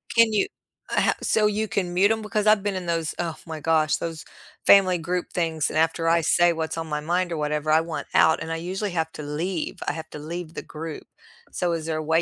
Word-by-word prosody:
Can 230 -1 +5
you 205 - +2 0.5
eh, - - +4
ho - - +3
so 215 -1 +2
you 210 +1 -1
can 195 -3 -2
mute 195 +4 +4
'em? 220 0 0
Because 215 0 -1
I've 210 -2 +5
been 205 -1 -1
in 185 -1 -4
those 165 -2 -1
oh 170 -2 -2
my 160 -2 -6
gosh, 155 0 +2
those 165 -1 -5 0.4
family 185 -2 +6
group 175 +1 -3
things. 165 -3 0
And - - -3
after 165 +1 +1
I 165 0 +4
say 175 +2 +4
what's 160 0 -3
on 165 0 -3
my 150 -1 -2
mind 175 +4 -1
or 165 - -2
whatever, 150 0 -1
I 160 +1 +5
want 165 -1 -5
out, 160 - +4
and 165 - -4
I 165 - -1
usually 190 +4 -3
have 160 -2 -1
to 150 - -7
leave. 160 +4 -3
I - - +1
have 160 0 -7
to 150 - -7
leave 165 +2 -6
the - - -5
group. 160 0 -7 0.4
So, 175 -1 -1
is 165 -2 -3
there 160 -1 -2
a 155 - -3
way 160 +2 +2
165 Hz, 250 wpm, -24 LUFS, 160-185 Hz, 0.5 s, family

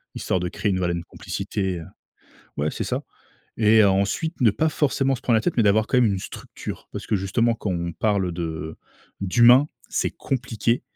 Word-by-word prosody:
histoire 95 - -1
de 90 - -2
créer 105 - -2
une 95 - 0
voilà, 90 -1 0
une 85 0 -3
complicité, 95 +1 -4
heu 80 - -9 0.7
ouais, 75 +1 0
c'est - - -4
ça - - -2 0.6
et 110 0 +6
ensuite 100 - +1
ne 110 - +6
pas 160 +9 +1
forcément 135 -3 +1
se 125 - -8
prendre 115 -3 +3
la - - +3
tête 175 - -1
mais 115 - +4
d'avoir 105 +1 +3
quand 125 - 0
même 125 - +5
une 95 - -1
structure - - -8
parce - - -6
que 105 - +1
justement, 115 +5 +1
quand 105 -3 -4
on 85 -1 -2
parle 100 -1 0
de 80 -2 -5 0.5
d'humain, 120 +8 +6 0.2
c'est - - 0
compliqué 120 -2 -1
105 Hz, 195 wpm, -23 LUFS, 90-120 Hz, 0.7 s, et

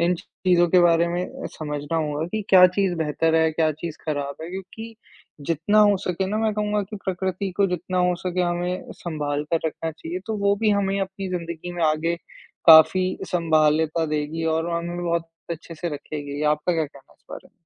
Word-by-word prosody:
इन 175 +1 +3
चीज़ों 175 0 +1
के 180 +1 +5
बारे 170 0 +4
में 175 +1 -1
अ, - - -8
समझना 150 +1 -3
होगा 150 0 -1
कि 215 +4 -3
क्या 185 -1 +8
चीज़ 185 0 0
बेहतर 160 +1 +1
है, 160 0 +4
क्या 155 0 +2
चीज़ 155 +1 -7
ख़राब 145 -2 -3
है, 165 - -6
क्योंकि 195 +5 -8 0.5
जितना 170 +6 +1
हो 205 -1 +6
सके 185 +1 -1
ना 210 +3 -2
मैं 220 -1 +1
कहूँगा 210 0 0
कि 210 +2 -8
प्रकृति 190 +1 -2
को 200 -1 +3
जितना 180 0 -2
हो 180 0 +3
सके 180 0 -3
हमें 175 +1 -2
सँभालकर 150 0 -2
रखना 160 +1 -3
चाहिए 160 +3 -6
तो 220 -1 -2
वो 200 0 +3
भी 215 -2 +3
हमें 200 -1 +1
अपनी 195 0 -4
ज़िंदगी 170 0 -5
में 175 - -3
आगे 155 +2 +1 0.5
काफ़ी 165 +3 +8 0.2
सँभालता 160 -1 +2
देगी 155 +2 -2
और 165 +1 -1
हमें 170 +1 -3
बहुत 170 -1 -1 0.2
अच्छे 165 0 -6
से 175 +2 -4
रखेगी। 145 0 -6
आपका 150 +4 -2
क्या 160 -2 +1
कहना 140 -2 -15
है - - -29
इस - - -39
बारे - - -9
में? - - -27
170 Hz, 195 wpm, -23 LUFS, 160-185 Hz, 0.5 s, क्या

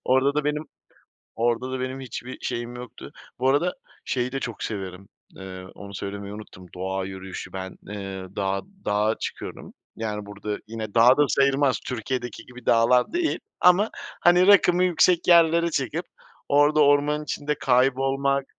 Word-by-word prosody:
Orada 130 +2 +3
da 150 - 0
benim, 150 +1 -1 0.7
orada 120 +3 0
da 130 - -3
benim 130 +1 -4
hiçbir 130 0 -7
şeyim 120 0 -4
yoktu 125 0 -10 0.3
Bu 130 - +2
arada, 170 +6 +1 0.3
şeyi 125 0 -1
de 135 - -2
çok 120 -5 -5
severim, 95 -2 -6 0.3
eee, 95 -1 -8
onu 100 0 -10
söylemeyi 100 +1 -6
unuttum. 95 -4 -11
Doğa 95 +1 -3
yürüyüşü, 95 -1 -8
ben, 95 0 -6
eee, 95 -2 -6
dağa 100 -1 -1 0.2
dağa 105 +2 +1
çıkıyorum. - - -7 0.2
Yani, 105 -2 -4
burada 105 +1 -5
yine 110 -2 -6
dağ 120 +3 +7
da 150 - +5
sayılmaz, 140 0 +2
Türkiye'deki 125 0 -4
gibi 125 0 -13
dağlar 120 - +4
değil, 345 -1 0 0.2
ama, 180 +5 +5 0.3
hani, 175 +1 +5
rakımı 185 -3 +6
yüksek 175 0 +3
yerlere 170 0 +5
çıkıp, 155 +5 -2 0.4
orada 145 +2 +4
ormanın 145 +1 +3
içinde 150 0 -2
kaybolmak 135 +1 +2
125 Hz, 150 wpm, -25 LUFS, 105-145 Hz, 0.7 s, dağ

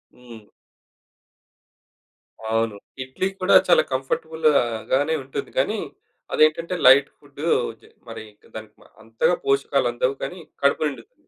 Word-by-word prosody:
హ్మ్. 120 -3 -13 2.1
అవును. 115 -1 0 0.3
ఇడ్లీ 130 +8 -3
కూడా 185 - +4
చాలా 175 - +5
కంఫర్టబుల్‌గానే 140 -1 0
ఉంటుంది 130 - -6
గానీ, - - 0 0.5
అది - - -1
ఏంటంటే 165 +3 -2
లైట్ 135 +2 +7
ఫుడ్. - - -14 0.4
జ - - -29 0.3
మరి - - -8
ఇంక 105 - -35 0.6
అంతగా 115 +10 0
పోషకాలందవు 135 -2 0
కానీ 180 - -6 0.2
కడుపు 140 +2 +2
నిండుతుంది. 135 -6 -11
135 Hz, 105 wpm, -22 LUFS, 120-155 Hz, 2.1 s, లైట్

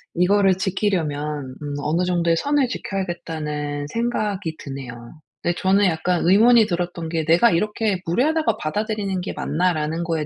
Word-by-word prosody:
이거를 190 +2 +3
지키려면 150 -8 -2
음 145 -1 -5
'어느 160 +5 0
정도의 170 -2 +1
선을 285 - +1
지켜야겠다.'는 155 -9 -4
생각이 205 -5 -2
드네요. 130 -1 -9 0.2
근데 175 0 0
저는 195 +2 +3
약간 175 0 +1
의문이 225 +4 +6
들었던 175 -3 -3
게 160 -1 -1
'내가 170 +9 +5
이렇게 210 +1 0
무례하다고 305 - +1
받아들이는 205 +2 -2
게 - - -5
맞나?'라는 160 -1 -1
거에 165 -2 -1
175 Hz, 365 characters per minute, -22 LUFS, 155-205 Hz, 0.2 s, 의문이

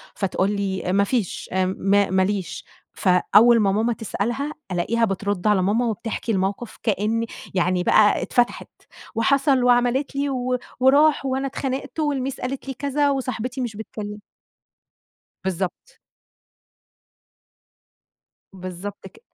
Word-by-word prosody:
فتقول 195 0 0
لي: 190 -2 -2
"ما 200 0 +4
فيش 215 -3 -2
امم 185 0 +1
ما 200 0 +3
ماليش" 190 -3 -1 0.3
فأول 210 +5 +5
ما 200 -2 +3
ماما 225 +4 +1
تسألها 240 +6 -3 0.2
ألاقيها 230 +7 +1
بترد 200 0 -2
على 205 -3 +4
ماما 215 +6 +1
وبتحكي 225 0 -3
الموقف 195 +4 -2
كأن 220 +2 0 0.3
يعني 180 0 +1
بقى 210 +2 +4
اتفتحت 245 -1 0 0.5
وحصل 270 +2 +3
وعملت 245 +3 +2
لي 280 0 0
و 255 -1 -1 0.2
وراح 280 +2 +4
وأنا 265 +1 -1
اتخانقت 270 +3 -4
والميس 275 -3 -1
قالت 270 +2 -4
لي 270 - -3
كذا 285 +2 0
وصاحبتي 255 -1 -2
مش 230 -4 -3
بتكلم 210 -1 -7 1.2
بالضبط. 185 -1 -4 2.5
بالضبط 185 +1 -7
كد 445 - -21
225 Hz, 120 wpm, -23 LUFS, 195-260 Hz, 2.5 s, فأول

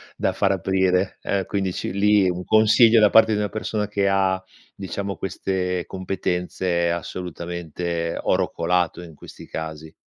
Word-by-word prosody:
da - - 0
far 100 - +1
aprire, 95 0 0
eh, 100 -2 -1
quindi 95 -2 -2
ci - - -4
lì 100 0 +3
un 90 0 -4
consiglio 110 +1 +5
da 105 - +6
parte 110 -1 +5
di - - 0
una 105 -1 -1
persona 110 -1 -3
che 100 -1 0
ha, 95 -1 +1 0.3
diciamo 100 +1 -5
queste 90 -1 -2
competenze 90 -2 -2
assolutamente 85 -1 -4
è - - -5
oro - - +1
colato 90 0 0
in 85 -3 -12
questi - - -12
casi. 80 0 -7
95 Hz, 155 wpm, -23 LUFS, 85-100 Hz, 0.3 s, da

